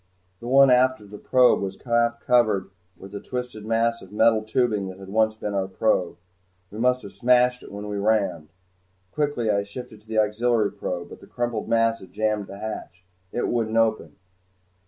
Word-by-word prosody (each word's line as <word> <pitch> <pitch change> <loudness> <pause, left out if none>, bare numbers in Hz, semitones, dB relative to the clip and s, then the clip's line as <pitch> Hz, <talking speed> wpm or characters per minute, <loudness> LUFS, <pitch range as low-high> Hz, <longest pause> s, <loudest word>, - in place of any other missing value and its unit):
The 120 - -8
one 135 +1 +6
aft 130 0 +4
of 105 -1 -16
the 105 - -9
probe 125 -4 +4
was 95 -1 -5
half 120 -1 +1
covered 110 -6 +2 0.3
with 95 +1 -12
a 100 - -5
twisted 125 -4 -6
mass 115 +1 +1
of 95 - -14
metal 110 +1 +3
tubing 110 -2 0
that 95 0 -8
had 95 0 -11
once 110 +1 +2
been 105 -1 -5
our 95 -1 -1
probe. 95 -2 0 0.5
We 105 - -8
must 125 +1 +2
have 100 - -10
smashed 125 0 +3
it - - -12
when 100 +1 -7
we 105 -1 -4
rammed. 100 -7 0 0.6
Quickly 145 -7 0
I 100 -1 +1
shifted 110 +2 -9
to 110 - -30
the 110 0 -3
auxiliary 110 0 +2
probe, 90 -3 -5
but - - -11
the - - -15
crumpled 120 -3 -3
mass 115 0 +2
had 95 - -15
jammed 105 -1 -1
the 100 - -9
hatch. 95 -4 -7 0.3
It 120 - -1
wouldn't 115 -2 -1
open. 110 -9 +1
110 Hz, 195 wpm, -24 LUFS, 100-120 Hz, 0.6 s, one